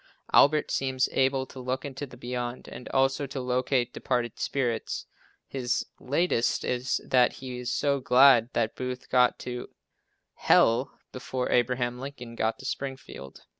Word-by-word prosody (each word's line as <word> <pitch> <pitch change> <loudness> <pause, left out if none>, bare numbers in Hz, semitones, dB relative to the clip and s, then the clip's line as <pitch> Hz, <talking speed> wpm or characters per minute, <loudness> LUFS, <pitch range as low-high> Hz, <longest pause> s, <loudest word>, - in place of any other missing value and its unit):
Albert 150 +1 +5
seems 130 -1 +1
able 135 0 +1
to 130 - -12
look 130 +2 -3
into 140 +1 -6
the - - -13
"beyond" 120 0 -5
and 125 - -9
also 135 +1 +1
to 135 0 -5
locate 125 0 0
departed 120 -3 -2
spirits. 125 -5 -2 0.4
His 130 -2 -1
"latest" 135 -3 0
is 125 +1 -1
that 125 -1 +3
he 125 -2 -7
is 125 - -3
so 140 -1 +1
glad 125 -2 +6
that 115 -1 0
Booth 125 0 -5
got 125 -1 +4
to 125 -1 -5 0.8
h - - -6
l 120 +5 +5 0.2
before 130 0 -3
Abraham 125 0 +1
Lincoln 130 -3 -8
got 110 -1 -1
to 130 - -12
Springfield. 130 - -6
125 Hz, 150 wpm, -27 LUFS, 125-135 Hz, 0.8 s, glad